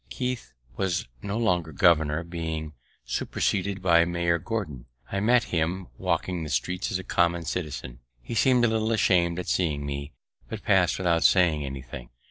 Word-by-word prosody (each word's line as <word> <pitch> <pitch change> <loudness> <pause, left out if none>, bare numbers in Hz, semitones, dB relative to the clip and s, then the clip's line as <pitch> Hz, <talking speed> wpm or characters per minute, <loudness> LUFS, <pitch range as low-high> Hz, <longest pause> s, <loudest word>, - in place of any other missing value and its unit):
Keith 125 -2 -4 0.3
was 90 -6 -1
no 100 +2 -3
longer 90 -8 +1
governor, 80 0 +3
being 80 -2 -5 0.3
superseded 95 +9 -1
by 85 -2 +5
Major 85 0 0
Gordon. 90 - -4 0.2
I 100 - 0
met 120 +4 +4
him 85 +2 -1
walking 90 +6 -1
the 75 - -5
streets 80 +8 -1
as - - 0
a 95 - -7
common 85 -1 +1
citizen. 75 -7 -4 0.2
He - - -8
seem'd 125 +2 +4
a - - +4
little 110 0 0
asham'd 90 -6 +2
at 90 - -4
seeing 75 -5 0
me, 70 +1 -5 0.4
but 110 -2 -6
pass'd 90 -4 +3
without 85 -3 +1
saying 85 -5 +4
anything. 65 -3 -7
85 Hz, 160 wpm, -26 LUFS, 80-95 Hz, 0.4 s, by